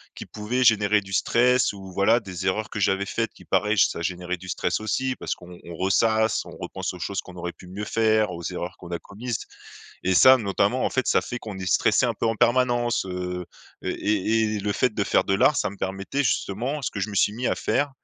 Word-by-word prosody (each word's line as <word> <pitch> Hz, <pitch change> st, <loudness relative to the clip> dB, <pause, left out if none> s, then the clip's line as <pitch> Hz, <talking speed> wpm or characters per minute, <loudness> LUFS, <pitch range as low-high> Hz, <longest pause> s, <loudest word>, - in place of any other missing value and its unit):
qui -, -, -7 dB
pouvaient 120 Hz, +4 st, -2 dB
générer 105 Hz, -2 st, +4 dB
du 95 Hz, -1 st, -10 dB
stress 125 Hz, +6 st, +3 dB
ou 95 Hz, -2 st, -10 dB
voilà, 100 Hz, +5 st, +4 dB
des 95 Hz, -5 st, -7 dB
erreurs, 105 Hz, +3 st, 0 dB
que -, -, -7 dB
j'avais 95 Hz, 0 st, +2 dB
faites 115 Hz, +2 st, -2 dB
qui, -, -, -17 dB
pareil, 105 Hz, +1 st, +1 dB
j -, -, +6 dB
ça -, -, -5 dB
générait 90 Hz, +1 st, -2 dB
du 95 Hz, +1 st, -11 dB
stress 90 Hz, +3 st, -1 dB
aussi. 130 Hz, +5 st, -1 dB
Parce -, -, -3 dB
qu'on 90 Hz, 0 st, -12 dB
on 85 Hz, -, -9 dB
ressasse, 110 Hz, +4 st, +2 dB
on -, -, -10 dB
repense 95 Hz, 0 st, -5 dB
aux 90 Hz, -, -10 dB
choses 95 Hz, +3 st, -3 dB
qu'on 90 Hz, -, -13 dB
aurait 90 Hz, 0 st, -4 dB
pu 90 Hz, -, -15 dB
mieux 100 Hz, +4 st, -6 dB
faire, 110 Hz, -2 st, +2 dB
aux 85 Hz, -1 st, -7 dB
erreurs 90 Hz, -1 st, -5 dB
qu'on 85 Hz, -, -11 dB
a 85 Hz, -, -2 dB
commises. 115 Hz, +2 st, -5 dB, 0.6 s
Et 95 Hz, -, +1 dB
ça, 130 Hz, +7 st, +8 dB
notamment, 100 Hz, +3 st, +1 dB
en -, -, +1 dB
fait, 130 Hz, -, -1 dB
ça -, -, +4 dB
fait 120 Hz, -, -5 dB
qu'on 105 Hz, -5 st, -8 dB
est 95 Hz, -, -5 dB
stressé, -, -, +3 dB
un -, -, -1 dB
peu, -, -, -2 dB
en 115 Hz, -, +2 dB
permanence, 120 Hz, -1 st, +2 dB
heu, 90 Hz, -1 st, -4 dB, 0.4 s
et -, -, -2 dB
et 105 Hz, +1 st, +1 dB
et -, -, -1 dB
le 105 Hz, +1 st, -1 dB
fait 125 Hz, +1 st, +1 dB
de 100 Hz, -, 0 dB
faire -, -, +2 dB
de 95 Hz, -, +1 dB
l'art 150 Hz, -, +4 dB
ça 105 Hz, -, 0 dB
me 100 Hz, -, -10 dB
permettait, 95 Hz, +10 st, -2 dB
justement 125 Hz, +6 st, -1 dB
ce 135 Hz, -, -2 dB
que 100 Hz, -, -5 dB
je 105 Hz, -, -2 dB
me -, -, -7 dB
suis 100 Hz, +2 st, +2 dB
mis 125 Hz, +2 st, -3 dB
à -, -, +1 dB
faire. 145 Hz, 0 st, 0 dB
105 Hz, 245 wpm, -25 LUFS, 95-115 Hz, 0.6 s, ça